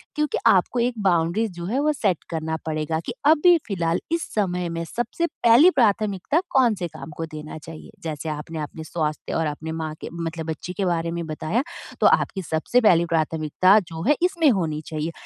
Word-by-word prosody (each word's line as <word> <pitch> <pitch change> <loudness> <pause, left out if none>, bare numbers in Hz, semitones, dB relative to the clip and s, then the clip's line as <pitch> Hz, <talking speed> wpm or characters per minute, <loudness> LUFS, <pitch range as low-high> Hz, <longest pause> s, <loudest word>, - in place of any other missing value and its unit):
क्योंकि 300 -2 0
आपको 195 +6 +3
एक 245 +1 +1
बाउंड्रीज़ 185 +4 +1
जो 170 0 -7
है 235 +9 -1
वो 305 - +3
सेट 200 - 0
करना 160 -1 -2
पड़ेगा 160 0 -1
कि - - -4
अभी 325 +3 +6
फ़िलहाल 170 -5 0
इस 335 0 0
समय 180 -4 -1
में 165 0 -3
सबसे 240 - -2
पहली 245 +5 +5
प्राथमिकता 215 - +1
कौन 250 -5 +4
से 180 -3 -3
काम 160 - -10
को 165 - -3
देना 155 -1 -8
चाहिए? 160 0 -11
जैसे 155 -1 -4
आपने 155 +2 -5
अपने 155 +1 -6
स्वास्थ्य 155 -2 -3
और 165 - +1
अपने 155 +2 -5
माँ 155 -1 -3
के - - -6
मतलब 165 -1 -4
बच्चे 175 +3 -6
के 195 -1 -2
बारे 170 -1 0
में 170 0 -3
बताया, 155 - -1 0.4
तो - - +7
आपकी 195 - +2
सबसे 160 +10 +1
पहली 175 -6 +5
प्राथमिकता 165 +3 +3
जो 165 0 -6
है 295 - +5
इसमें 340 -5 +3
होनी 160 -7 -1
चाहिए। 155 +1 -3
170 Hz, 195 wpm, -23 LUFS, 160-225 Hz, 0.4 s, तो